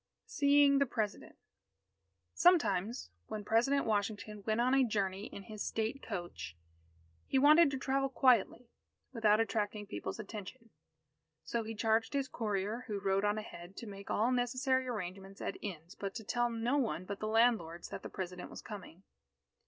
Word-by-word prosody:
_ - - -55 0.3
SEEING 285 -1 +5
THE 280 - +3
PRESIDENT 215 -4 -3 1.0
Sometimes, 235 - +3 0.2
when 210 -1 -5
President 245 +7 +2
Washington 210 0 -1
went 215 +1 +1
on 250 +2 +3
a 270 -1 +5
journey 200 -3 -1
in 200 - -9
his 215 +1 -8
state 225 +5 -2
coach, 175 - -6 0.7
he - - +1
wanted 300 +3 +7
to 275 - -3
travel 270 +1 0
quietly, 250 -2 +3 0.4
without 215 -3 +4
attracting 210 -2 -1
people's 205 - -5
attention. 220 +2 -8 0.7
So 235 - -1
he 225 0 -6
charged 225 +2 +1
his 275 -1 0
courier, 210 +1 -2
who 210 -3 -2
rode 195 0 +1
on 205 +1 +2
ahead, 185 -3 -8
to - - -6
make 200 -2 -9
all 230 +4 +2
necessary 255 +1 +1
arrangements 195 -3 -5
at - - -3
inns, 175 -3 -6
but 195 -1 -5
to 225 - -5
tell 240 +3 +1
no 235 +4 0
one 220 -8 -1
but 200 +1 -5
the 215 - -2
landlords, 215 -7 +2
that - - -6
the - - -7
President 180 -1 -6
was - - -9
coming. 195 -4 -9
220 Hz, 165 wpm, -34 LUFS, 200-250 Hz, 1.0 s, wanted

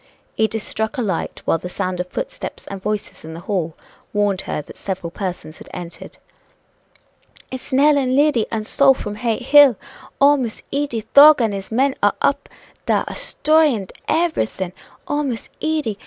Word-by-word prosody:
Edith 220 0 0
struck 220 +5 -3
a - - 0
light, 190 -6 -3
while 165 - +1
the 180 - -7
sound 180 0 -3
of 180 - -2
footsteps - - -6
and 195 -1 -7
voices 210 +1 -4
in 160 +1 -8
the 165 - -8
hall 170 -4 -2 0.4
warned 205 -2 +1
her - - -1
that - - -13
several 185 -3 -5
persons 175 -5 -6
had - - -12
entered. 175 -1 -9 1.3
"It's 260 +2 -8
Nell, 285 +2 +4
and 260 -1 0
Liddy, 285 -5 +3
and 220 -2 -2
Sol, 270 +3 +4
from 205 - -5
Hay 225 +1 -1
Hill! 275 0 +6 0.4
Oh, 285 +1 +6
Miss 240 -5 -4
Edy! 280 -5 -1
Thorg 295 +1 +9
and 225 -4 +1
his 195 +1 -6
men 265 +4 +2
are - - +3
up - - 0 0.4
dar - - +2
a - - -5
'stroyin' 300 -11 +1 0.2
everything! 310 - -1 0.3
Oh, 290 +1 0
Miss 255 -6 -4
Edy! 300 -10 -1
225 Hz, 170 wpm, -20 LUFS, 195-280 Hz, 1.3 s, Thorg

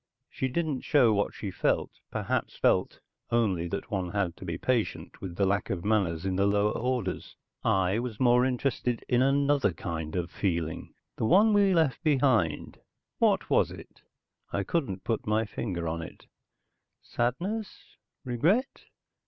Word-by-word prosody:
She 130 - -2
didn't 150 0 -2
show 125 -7 +4
what 100 0 0
she 100 - -5
felt, - - 0 0.2
perhaps - - -2
felt - - +1 0.3
only 100 -8 +1
that 100 +4 -5
one 95 -3 -1
had 95 -3 -1
to - - -9
be 85 -3 -3
patient 120 +2 -2
with 90 -3 -6
the 100 - +2
lack 100 0 0
of 90 -2 -3
manners 95 -6 +1
in 95 -1 -1
the 100 +1 +3
lower 105 +1 +2
orders. 125 0 -2 0.3
I 95 +2 +2
was 120 -3 -5
more 125 -1 +5
interested 125 -2 -1
in 125 0 +3
another 140 -4 +3
kind 80 -1 -5
of 90 -1 -2
feeling, 85 -5 -2 0.2
the - - 0
one 205 - +5
we 200 -2 +4
left 160 -6 +2
behind. 130 - +1 0.4
What - - +3
was - - +4
it? - - -12 0.5
I 100 - -1
couldn't 100 - -2
put 115 -2 -2
my 110 +1 +2
finger 90 -5 -4
on 80 +1 -2
it. - - -10 0.8
Sadness? 185 - -3 0.3
Regret? 165 - 0
110 Hz, 155 wpm, -28 LUFS, 95-130 Hz, 0.8 s, more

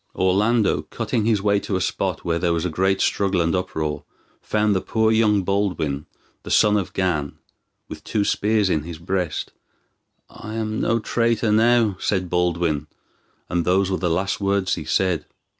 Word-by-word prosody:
Orlando, 105 +4 +2
cutting 110 - -2
his 110 -3 +1
way 100 -1 +3
to 100 - -3
a - - +1
spot 90 - -2
where 85 -1 0
there 85 -1 +1
was 85 +1 -1
a 90 - -1
great 95 +4 +1
struggle 100 -2 +1
and 85 0 +1
uproar, 80 -5 -3 0.4
found 105 -1 +1
the 95 - +1
poor 110 -1 +1
youth 105 -3 +3
Baldwin, 90 -8 -1 0.3
the - - -10
son 105 0 +4
of 100 -4 -1
Gan, 85 -7 -1 0.5
with - - -9
two 105 - 0
spears 105 -1 +1
in 75 - +1
his 85 +1 -8
breast. 90 -1 -3 0.8
"I 110 +1 -9
am 110 -1 -2
no 115 - +2
traitor 115 -1 0
now," 110 -2 +3
said 95 -3 -1
Baldwin, 85 -4 0 0.6
and 85 -1 0
those 95 +2 +2
were 95 - 0
the 90 - 0
last 95 +5 -1
words 100 -1 +1
he - - -4
said. 90 -4 0
95 Hz, 175 wpm, -22 LUFS, 85-105 Hz, 0.8 s, son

